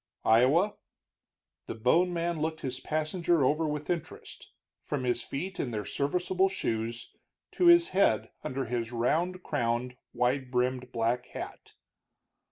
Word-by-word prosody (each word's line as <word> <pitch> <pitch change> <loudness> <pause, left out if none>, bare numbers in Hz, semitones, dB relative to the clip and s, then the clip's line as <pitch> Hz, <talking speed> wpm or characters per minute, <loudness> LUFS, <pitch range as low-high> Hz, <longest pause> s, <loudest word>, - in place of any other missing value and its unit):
"Iowa." 135 - +4 0.9
The - - -5
bone 165 +11 +3
man 170 -2 -2
looked 160 0 -2
his 130 -1 -4
passenger 155 0 +1
over 155 +4 +2
with 150 0 -3
interest, 170 -3 -5 0.3
from 145 -3 -3
his 125 -1 0
feet 180 +11 -5
in 130 - -1
their 105 -3 -4
serviceable 180 +6 0
shoes, 115 -8 -3 0.4
to 355 - +2
his 345 0 +7
head 110 - +2
under 135 +1 -3
his 115 -1 -3
round 170 +10 0
crowned, 125 -2 -1
wide 125 +1 0
brimmed 125 0 -1
black 115 +1 0
hat. - - -8
140 Hz, 135 wpm, -29 LUFS, 125-170 Hz, 0.9 s, his